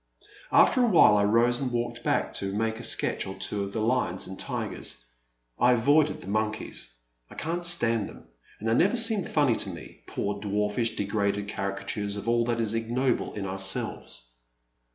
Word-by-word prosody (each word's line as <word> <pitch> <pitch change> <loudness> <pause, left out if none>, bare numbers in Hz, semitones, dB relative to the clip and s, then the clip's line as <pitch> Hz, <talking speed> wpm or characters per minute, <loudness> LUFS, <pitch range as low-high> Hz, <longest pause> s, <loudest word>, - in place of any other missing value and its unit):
After 255 - +5
a 245 - +4
while 165 - +6
I 100 - +3
rose 120 +4 +3
and 130 -2 -2
walked 120 0 -3
back - - 0
to 100 0 -3
make 110 +2 -2
a - - -7
sketch - - +1
or 95 - -6
two 100 +1 -3
of 100 - -6
the 110 - -3
lions 110 -6 0
and 95 - -8
tigers. - - -3 0.5
I 125 0 +5
avoided 145 +6 +2
the - - -12
monkeys 110 - -2 0.2
— - - -47
I - - -13
can't 170 +2 -3
stand 115 - +3
them, - - -13 0.4
and 110 - -5
they 115 - +2
never 190 - +3
seem 225 -4 +5
ftmny 145 -6 +1
to 100 - +3
me, 85 - -10
poor 100 0 -3
dwarfish, 105 +3 -1
degraded 100 0 -1
carica 100 -1 -4
tures 105 -1 -3
of 100 - -7
all 120 0 +2
that 120 -1 -1
is 110 -2 +1
ignoble 120 +3 -1
in 100 -2 -5
ourselves. 95 -11 -3
110 Hz, 190 wpm, -27 LUFS, 100-120 Hz, 0.5 s, while